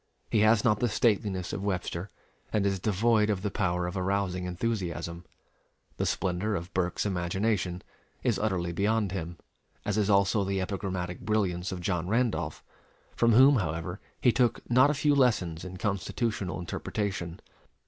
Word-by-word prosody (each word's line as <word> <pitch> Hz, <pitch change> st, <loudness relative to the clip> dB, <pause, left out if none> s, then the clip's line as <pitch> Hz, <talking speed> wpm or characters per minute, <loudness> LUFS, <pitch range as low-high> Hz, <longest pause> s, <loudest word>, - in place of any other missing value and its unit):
He 110 Hz, -, +3 dB
has 110 Hz, +1 st, +5 dB
not 105 Hz, -2 st, +3 dB
the 120 Hz, -, +1 dB
stateliness 100 Hz, -5 st, +1 dB
of 95 Hz, -, -3 dB
Webster, 90 Hz, -1 st, -2 dB, 0.4 s
and 105 Hz, -2 st, +1 dB
is 95 Hz, -1 st, +1 dB
devoid 110 Hz, +2 st, +2 dB
of 100 Hz, -3 st, -1 dB
the 105 Hz, -, -1 dB
power 90 Hz, -3 st, 0 dB
of 90 Hz, +2 st, -4 dB
arousing 95 Hz, -1 st, -1 dB
enthusiasm. 90 Hz, -3 st, -3 dB, 0.7 s
The -, -, 0 dB
splendor 95 Hz, +3 st, -1 dB
of 85 Hz, +1 st, -5 dB
Burke's 90 Hz, +1 st, 0 dB
imagination 90 Hz, 0 st, -1 dB, 0.4 s
is 115 Hz, -6 st, +1 dB
utterly 95 Hz, -5 st, 0 dB
beyond 105 Hz, +1 st, +1 dB
him, 85 Hz, -2 st, -4 dB, 0.5 s
as 105 Hz, +1 st, 0 dB
is 105 Hz, -1 st, +1 dB
also 100 Hz, +1 st, +3 dB
the 95 Hz, 0 st, -1 dB
epigrammatic 95 Hz, -2 st, -3 dB
brilliance 100 Hz, -4 st, 0 dB
of 90 Hz, -1 st, -5 dB
John 90 Hz, -2 st, -1 dB
Randolph, 115 Hz, +3 st, 0 dB, 0.5 s
from 115 Hz, -1 st, +4 dB
whom, 135 Hz, +4 st, +7 dB
however, 90 Hz, 0 st, -3 dB, 0.2 s
he 125 Hz, -, +4 dB
took 120 Hz, -1 st, +1 dB
not 130 Hz, +3 st, +6 dB
a 150 Hz, -, +1 dB
few 145 Hz, +1 st, +3 dB
lessons 105 Hz, -, +2 dB
in 95 Hz, 0 st, -7 dB
constitutional 100 Hz, 0 st, -2 dB
interpretation. 90 Hz, -1 st, -3 dB
100 Hz, 155 wpm, -29 LUFS, 90-110 Hz, 0.7 s, whom